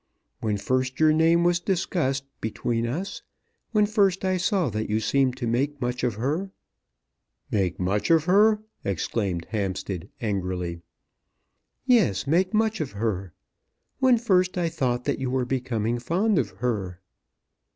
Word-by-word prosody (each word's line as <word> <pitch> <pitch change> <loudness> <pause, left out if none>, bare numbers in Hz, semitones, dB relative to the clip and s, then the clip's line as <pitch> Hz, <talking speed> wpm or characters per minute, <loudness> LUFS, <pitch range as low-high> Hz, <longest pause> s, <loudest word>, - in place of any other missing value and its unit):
When 105 -2 -1
first 130 +4 -1
your 155 -1 +5
name 165 +2 +4
was 175 0 +3
discussed 170 -7 -1 0.2
between 115 +1 -1
us; 180 +11 -4 0.5
when 210 -2 +3
first 200 -3 +2
I 185 0 +1
saw 185 - +1
that 110 +1 -3
you 105 +1 +1
seemed 130 +2 +1
to 130 - -3
make 135 +5 0
much 125 -1 -2
of 120 -4 0
her 150 - -1 0.5
" 60 0 -42
"Make 95 -4 0
much 95 +3 0
of 165 -2 +5
her!" 210 +4 +4 0.2
exclaimed 95 -1 -2
Hampstead, 95 -3 -3
angrily. 90 -6 -3 1.0
"Yes; 225 - +3
make 175 +6 +2
much 220 -2 +1
of 140 -9 -4
her! 100 -4 -2 0.7
When 260 -2 +5
first 185 -5 +2
I 170 -2 +1
thought 125 -5 -1
that 140 - 0
you 130 -1 -2
were 130 -1 0
becoming 120 -3 -1
fond 180 - +1
of 115 - -1
her." 95 -4 -3
130 Hz, 150 wpm, -25 LUFS, 105-180 Hz, 1.0 s, your